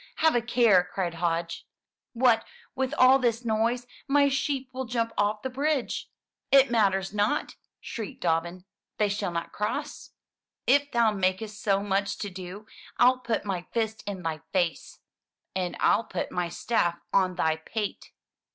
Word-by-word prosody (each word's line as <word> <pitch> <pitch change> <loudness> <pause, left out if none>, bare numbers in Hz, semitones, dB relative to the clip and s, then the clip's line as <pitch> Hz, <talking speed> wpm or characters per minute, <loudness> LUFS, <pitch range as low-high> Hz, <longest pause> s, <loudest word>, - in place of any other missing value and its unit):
"Have 320 0 +3
a 240 - +2
care!" 225 -6 +4
cried 180 -3 -2
Hodge. 170 0 -2 0.5
"What 235 -2 +4 0.3
with 265 0 -1
all 255 +1 +7
this 240 -1 0
noise, 230 +2 +1 0.2
my 280 0 +4
sheep 270 -1 -1
will 260 0 -3
jump 230 -1 -1
off 210 +1 0
the 260 - -2
bridge!" 280 0 -1 0.4
"It 275 -2 +6
matters 195 -4 +2
not!" 210 +1 0 0.2
shrieked 220 -4 -7
Dobbin. 170 +2 -1 0.3
"They 210 -1 +2
shall 200 -1 -1
not 170 -1 -4
cross!" 210 +1 -4 0.5
"If 285 +2 +3
thou 235 -2 +3
makest 205 +2 -1
so 200 -1 +1
much 200 0 0
to 205 - -5
do, 185 +3 -8 0.3
FU 250 +1 +6
put 235 -4 -2
my 185 -3 -3
fist 220 -2 -1
in 195 -3 -4
thy 160 -1 -2
face!" 175 -4 -1 0.5
"And 180 -2 -2
ril 230 - +3
put 185 - -4
my 175 -1 -1
staff 175 -2 0 0.2
on 185 -2 +3
thy 160 -3 +1
pate!" 205 +6 -5
210 Hz, 155 wpm, -27 LUFS, 185-240 Hz, 0.5 s, all